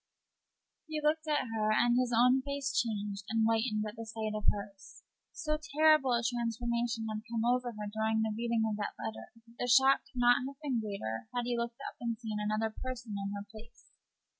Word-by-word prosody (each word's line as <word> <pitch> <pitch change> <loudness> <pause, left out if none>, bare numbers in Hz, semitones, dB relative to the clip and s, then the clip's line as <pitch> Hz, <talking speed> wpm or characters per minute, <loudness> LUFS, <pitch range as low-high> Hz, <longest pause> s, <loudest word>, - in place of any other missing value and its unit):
He 310 -1 -2
looked 305 +1 +1
at 295 -3 +1
her, 215 -1 +2
and 240 +2 +4
his 250 -1 +2
own 250 +3 +5
face 280 0 -3
changed 205 -4 -1
and 225 0 +2
whitened 220 -1 +1
at 210 +2 -8
the 230 - -5
sight 220 -1 -3
of 210 - -4
hers. 200 -1 -9 0.3
So 305 -1 -2
terrible 310 -3 +4
a 235 0 +1
transformation 235 -1 -1
had 215 0 -3
come 230 -1 0
over 245 0 +1
her 210 -1 -5
during 220 0 +1
the 220 -1 -1
reading 230 0 0
of 215 -1 -2
that 205 - -3
letter 110 0 -6
that 230 +1 -21
the 245 - -1
shock 265 +2 +6
could - - -17
scarcely 245 +1 +4
have 285 - -46
been 265 -5 0
greater 115 - -4
had 245 -1 0
he 245 0 0
looked 235 0 -3
up - - -9
and 230 -1 -2
seen 220 -3 -4
another 215 +1 0
person 250 -4 -5
in 200 0 -3
her 200 0 -5
place. 225 +1 -14
230 Hz, 205 wpm, -32 LUFS, 215-250 Hz, 0.3 s, shock